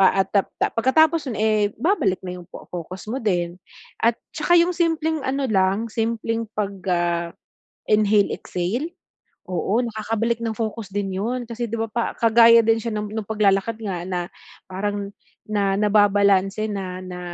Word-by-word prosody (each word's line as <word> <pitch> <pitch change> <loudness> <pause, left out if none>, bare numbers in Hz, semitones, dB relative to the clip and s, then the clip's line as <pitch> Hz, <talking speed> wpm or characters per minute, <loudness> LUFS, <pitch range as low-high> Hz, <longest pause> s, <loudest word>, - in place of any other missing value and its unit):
pa 195 0 +5
at - - -26 0.4
pagkatapos 310 +6 +3
'yun, 225 - -4
eh, 215 0 +2 0.2
babalik 240 - +1
na 180 0 -5
'yung 175 - -14
focus 180 +1 -8
mo 260 +3 -2
din. 175 -4 -1 0.4
At 230 0 +3 0.2
saka 335 +3 +3
'yung 345 +1 +3
simpleng 320 -2 0
ano 275 +1 0
lang, 195 0 +1
simpleng 225 0 -1
pag, 205 -1 -1 0.2
ah, 170 -1 0 0.6
inhale, 210 -1 +4
exhale? 220 - -3 0.6
Oo, 185 +5 0
nakakabalik 225 0 -1
ng 225 - -1
focus 220 -2 -4
din 195 -2 -2
'yon 245 +4 -2
kasi 235 +1 -4
'di - - -1
ba, 225 - -1
pa 235 +2 0 0.2
kagaya 230 0 +7
din 225 0 +3
siya 230 - -2
ng 210 +1 -4
pag-lalakad 210 +1 +1
nga 185 -5 -3
na 180 -2 -3 0.4
parang 200 +1 -3 0.4
na 200 -2 +1
nababalanse, 205 -1 +3
na 185 -2 -4
na 180 -1 -7
215 Hz, 150 wpm, -22 LUFS, 195-230 Hz, 0.6 s, kagaya